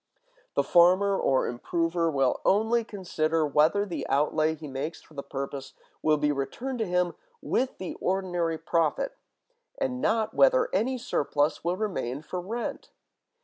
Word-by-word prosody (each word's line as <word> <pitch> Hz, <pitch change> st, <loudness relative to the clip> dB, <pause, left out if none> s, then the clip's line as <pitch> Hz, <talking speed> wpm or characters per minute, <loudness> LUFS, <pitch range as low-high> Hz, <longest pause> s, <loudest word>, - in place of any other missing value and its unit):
The -, -, +3 dB
farmer 185 Hz, +3 st, +5 dB
or 135 Hz, -7 st, +2 dB
improver 165 Hz, +7 st, -1 dB
will 135 Hz, -4 st, +1 dB
only 225 Hz, +4 st, +3 dB
consider 165 Hz, -6 st, -1 dB
whether 155 Hz, +8 st, +3 dB
the 180 Hz, -, -4 dB
outlay 155 Hz, +2 st, +2 dB
he 155 Hz, -1 st, -9 dB
makes 140 Hz, +4 st, -4 dB
for -, -, -20 dB
the 140 Hz, -, -5 dB
purpose 135 Hz, 0 st, -6 dB, 0.3 s
will 155 Hz, -1 st, +3 dB
be 150 Hz, 0 st, +1 dB
returned 235 Hz, -, -3 dB
to 220 Hz, -, 0 dB
him 180 Hz, 0 st, +1 dB, 0.3 s
with 260 Hz, -, -1 dB
the 185 Hz, -, -5 dB
ordinary 175 Hz, -3 st, 0 dB
profit, 165 Hz, -, 0 dB, 0.6 s
and 260 Hz, -2 st, -2 dB
not 220 Hz, -1 st, +1 dB
whether -, -, +4 dB
any 255 Hz, +3 st, +1 dB
surplus 150 Hz, -, 0 dB
will 175 Hz, +2 st, 0 dB
remain 155 Hz, -, -3 dB
for 180 Hz, +3 st, -4 dB
rent. 225 Hz, +6 st, -5 dB
175 Hz, 145 wpm, -27 LUFS, 150-215 Hz, 0.6 s, farmer